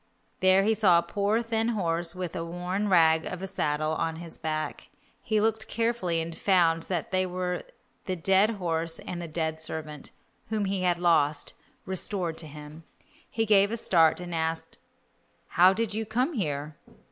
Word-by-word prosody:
There 190 +1 +5
he 220 +2 +3
saw 200 -6 +5
a 170 - +2
poor 205 +3 0
thin 225 -1 0
horse 175 -7 -1
with 180 -2 -5
a 165 - -2
worn 180 +4 -3
rag 160 -3 +5
of 180 +1 -6
a - - -1
saddle 155 -4 -1
on 160 0 -1
his 165 0 -9
back. 155 -1 -4 0.3
He 215 -1 0
looked 220 +1 0
carefully 230 -8 0
and 165 0 -4
found 170 -4 +3
that 175 -4 -2
they 185 0 +2
were 180 0 -2 0.4
the 185 - -2
dead 195 +4 +3
horse 165 -3 -1
and 175 -1 -6
the 170 - -5
dead 160 0 -2
servant, 155 -2 -5 0.4
whom 215 -2 0
he 195 -1 -1
had 180 -1 +2
lost, 160 -4 +2 0.3
restored 185 -3 -2
to 160 - -5
him. 150 +2 -11 0.5
He 225 0 -1
gave 200 -2 +5
a 230 - -2
start, 165 -7 +3
and 175 -1 -6
asked, 160 0 -2 0.7
"How 180 +2 +6
did 220 +2 -1
you 220 +1 -1
come 250 +9 -1
here?" 150 - -3
180 Hz, 175 wpm, -27 LUFS, 160-200 Hz, 0.7 s, How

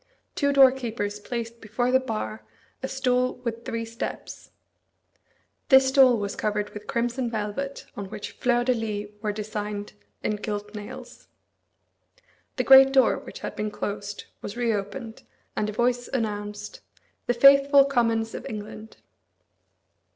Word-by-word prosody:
Two 285 0 +1
doorkeepers 240 -7 +3
placed 230 +1 -5
before 240 +3 -1
the 260 - +5
bar 110 - -4 0.4
a 265 - -2
stool 255 -1 0
with 230 -1 -4
three 230 0 -3
steps. 230 +1 -7 1.2
This 265 -1 +7
stool 265 -3 +6
was 200 -1 -3
covered 210 -1 -2
with 210 0 -10
crimson 240 +1 -1
velvet, 230 +6 -4
on 200 -1 -6
which 210 - -7
fleurs 245 -1 +1
de 255 - +3
lis 210 -3 -3
were 215 -1 -1
designed 210 -1 -5 0.3
in 210 - 0
gilt 205 0 -5
nails. 210 -1 -9 1.3
The - - 0
great 270 0 +8
door, 265 -1 +4
which - - -11
had - - -5
been 210 0 -2
closed, 205 0 -5 0.2
was 205 - -7
reopened; 225 0 -3 0.3
and 210 - -1
a - - -2
voice 245 +2 0
announced, 210 -3 -4 0.5
"The 245 - +2
faithful 275 +2 +7
Commons 230 -4 +1
of - - -6
England." 215 +1 -8
225 Hz, 135 wpm, -25 LUFS, 210-255 Hz, 1.3 s, great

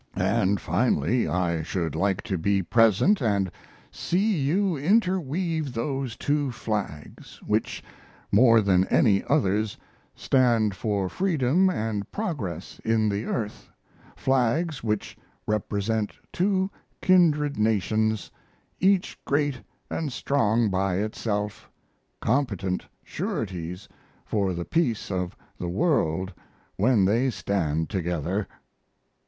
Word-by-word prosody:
And 100 -3 +1
finally 120 +5 +1
I 85 0 0
should 80 -1 -2
like 95 -1 0
to 95 - -2
be 95 +3 +1
present 115 - +4
and 100 -6 +1 0.4
see 200 +5 0
you 170 +6 +1
interweave 165 - 0
those 130 0 -2
two 145 +1 0
flags 105 -10 -5
which, - - -1 0.5
more 115 +1 +6
than 95 -2 +3
any 100 -3 +3
others, 110 -7 +1 0.4
stand 120 -5 +2
for 100 -2 -1
freedom 175 - +2
and 110 - -3
progress 145 - -4
in 110 -1 +2
the 100 +2 -2
earth 105 -3 -4 0.5
flags 135 +4 0
which 105 -2 -2 0.3
represent 105 0 -1 0.2
two 190 +1 +1 0.3
kindred 150 - +3
nations, 110 -3 +1 0.5
each 190 0 +2
great 145 -3 0 0.3
and 155 -4 -3
strong 115 -5 +1
by 95 0 0
itself, 105 0 -3 0.5
competent 105 -8 -1 0.2
sureties 90 -2 -4 0.4
for 100 -4 0
the 85 0 -4
peace 125 -12 0
of 90 -1 -3 0.2
the 90 - -3
world 95 - +1 0.4
when 105 -1 +3
they 115 +7 +2
stand 85 -7 -1
together. 90 +1 -2
110 Hz, 105 wpm, -26 LUFS, 95-140 Hz, 0.5 s, more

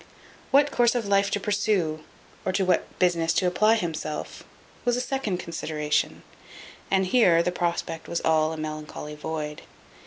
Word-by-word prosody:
What 285 +1 +4
course 240 0 +3
of 235 -3 0
life 200 0 +3
to 205 - -1
pursue, 195 -7 0 0.4
or 185 - 0
to 190 0 +1
what 180 - 0
business 170 -2 +2
to 185 - +1
apply 215 +5 +4
himself, 160 -6 -4 0.4
was 245 0 +1
a - - 0
second 250 -7 -2
consideration: 155 -3 -2 0.7
and 190 -1 +2
here 180 -5 +4
the 180 - 0
prospect 170 -2 -2
was 170 - -1
all 155 0 +2
a 160 - -5
melancholy 155 -1 -6
void. 150 0 -5
175 Hz, 155 wpm, -26 LUFS, 155-205 Hz, 0.7 s, What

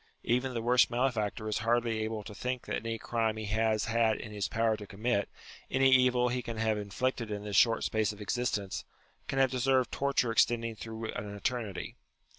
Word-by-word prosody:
Even 125 +2 0
the 115 - -2
worst 125 +1 +4
malefactor 120 -3 -1
is 105 - -1
hardly 115 -1 +1
able 110 -1 -3
to 105 - -9
think 125 +4 -3
that - - -2
any 115 0 -3
crime 115 -1 -1
he 110 - -4
has 110 +1 +1
had 115 -1 +2
it - - -7
in 105 - -8
his 100 -2 -2
power 115 +2 +1
to 105 -1 -9
commit, 105 +1 -1 0.4
any 135 0 +4
evil 125 -1 +4
he 125 +1 -1
can 115 -1 -6
have 110 -1 +1
inflicted 115 +3 -2
in 105 -1 -4
this 105 -1 -4
short 115 +2 +4
space 110 -2 +1
of 105 - -12
existence, 105 -3 -2 0.4
can 135 - -3
have 135 -1 +4
deserved 130 0 +2
torture 140 -4 +1
extending 115 0 +2
through 110 +1 -6
an 105 0 -6
eternity. 110 -3 -3
115 Hz, 200 wpm, -31 LUFS, 110-125 Hz, 0.4 s, worst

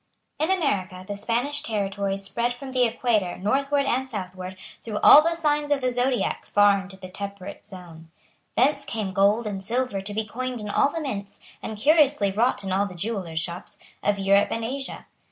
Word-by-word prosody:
In 310 +3 +1
America 200 - 0
the 205 - -4
Spanish 240 +8 0
territories 200 -2 -2
spread 235 +5 0
from 265 +2 -9
the 250 -2 +3
Equator 225 -6 0
northward 275 +8 +1
and 265 0 0
southward 185 -3 -6 0.3
through 215 -2 -4
all 295 - +10
the 335 +2 0
signs 295 -2 0
of 290 -1 +2
the 255 -1 0
Zodiac 250 +1 0
far 205 -1 +4
into 190 0 -11
the 185 -1 -9
temperate 200 +1 -7
zone. 170 -4 -11 0.5
Thence 280 +3 +3
came 215 -8 -4
gold 205 +4 +3
and 195 -2 -4
silver 235 -1 -1
to 205 +2 -4
be 220 0 -1
coined 250 +3 -4
in 210 -1 -5
all 275 - +3
the 325 +3 -4
mints, 205 -9 -5 0.2
and 220 - -5
curiously 285 -5 +4
wrought 215 0 +1
in 190 - -4
all 195 +2 +1
the 180 - -10
jewellers' 185 -4 -4
shops, 170 +2 -5 0.2
of 205 0 +1
Europe 200 +1 +4
and 225 0 -2
Asia. 270 +3 -5
210 Hz, 190 wpm, -25 LUFS, 195-260 Hz, 0.5 s, all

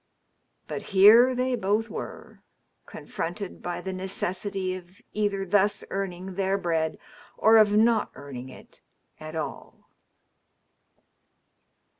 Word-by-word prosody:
But - - -4 0.2
here 230 +6 +8
they 255 0 0
botii 215 +1 0
were, - - -8 0.5
confronted 180 +3 -6
by 175 0 -4
the 190 - -5
necessity 190 0 -3
of 185 +1 -11
either 200 -2 -1
thus 205 +2 +2
earning 190 -1 -4
their 195 +1 0
bread 165 -4 -1 0.4
or 225 +1 +6
of 210 -1 +5
not 225 -1 +3
earning 130 -2 -8
it - - -14 0.4
at 155 +1 -8
all. 160 - -7
195 Hz, 110 wpm, -26 LUFS, 175-210 Hz, 0.5 s, here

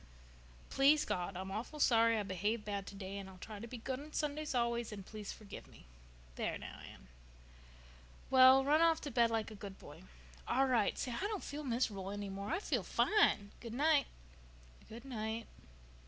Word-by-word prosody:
—Please, 285 +3 +5
God, 180 +1 -2
I'm 190 +1 -5
awful 235 +9 -5
sorry 230 -4 +5
I 210 - 0
behaved 205 +4 -2
bad 200 -2 -3
today 195 0 -6
and 195 -1 -8
I'll 190 - -13
try 210 +3 -8
to 230 - -7
be 245 - -7
good 255 +3 -4
on 300 +2 -11
Sundays 300 -1 -2
always 235 -1 0
and 200 -3 -7
please 210 -1 -7
forgive 205 -2 -10
me.—There - - -8
now, - - -9
Anne." 65 - -16 1.2
"Well, 260 0 +8
now, - - -5
run 305 +2 +5
off 330 -1 +4
to 290 - -5
bed 235 -1 +4
like 225 -1 -1
a - - -8
good 200 -2 -8
boy." - - -12 0.5
"All 270 +2 +3
right. 240 -6 +2
Say, 255 - -2
I 345 +12 -2
don't 420 -3 -4
feel 295 +1 -5
mis'rubul 225 -7 -1
any 205 0 -4
more. 200 +1 -5
I - - +1
feel 405 - -1
fine. 210 - +2
Good 235 -1 -7
night." 295 0 +3 0.8
"Good 235 +4 -10
night." 225 -3 -4
225 Hz, 185 wpm, -35 LUFS, 200-270 Hz, 1.2 s, Well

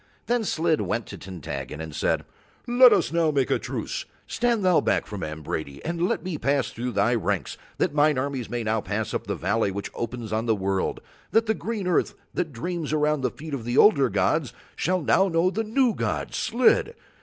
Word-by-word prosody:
Then 240 -1 +1
Slid 165 -5 +1
went 115 0 -2
to - - -9
Tintaggon 75 -7 -6
and 80 -1 -6
said: - - 0 0.4
"Let 245 0 +7
us - - +2
now 165 -2 +3
make 140 -4 +1
a - - +2
truce. - - -4 0.2
Stand 235 -4 0
thou 180 -2 +5
back - - +1
from 105 -3 -7
Ambrady 75 -2 -5
and 170 +2 0
let - - -1
me 180 -5 -4
pass 140 -1 +1
through 125 +1 -4
thy 115 +3 +2
ranks 115 - -1 0.2
that - - +1
mine 150 -1 +3
armies 130 -2 -2
may 120 -1 -2
now 110 0 0
pass 110 +2 -3
up - - -3
the - - -1
valley 100 +3 0
which 100 +1 -5
opens 115 -2 -5
on 110 +2 -1
the 110 - +3
world, 95 -1 -1 0.3
that 225 +1 +3
the 220 - +2
green 220 -2 -4
earth 180 - +1 0.2
that 170 -4 -2
dreams 160 +5 -4
around 150 -1 +2
the 130 - +1
feet 155 0 -9
of 120 -4 -4
older 140 - +6
gods 115 - +1 0.2
shall 185 -1 0
know 180 +2 +3
the 225 +3 -1
new 235 +2 +2
god - - -2
Slid. 250 - +2
140 Hz, 200 wpm, -25 LUFS, 110-180 Hz, 0.4 s, Let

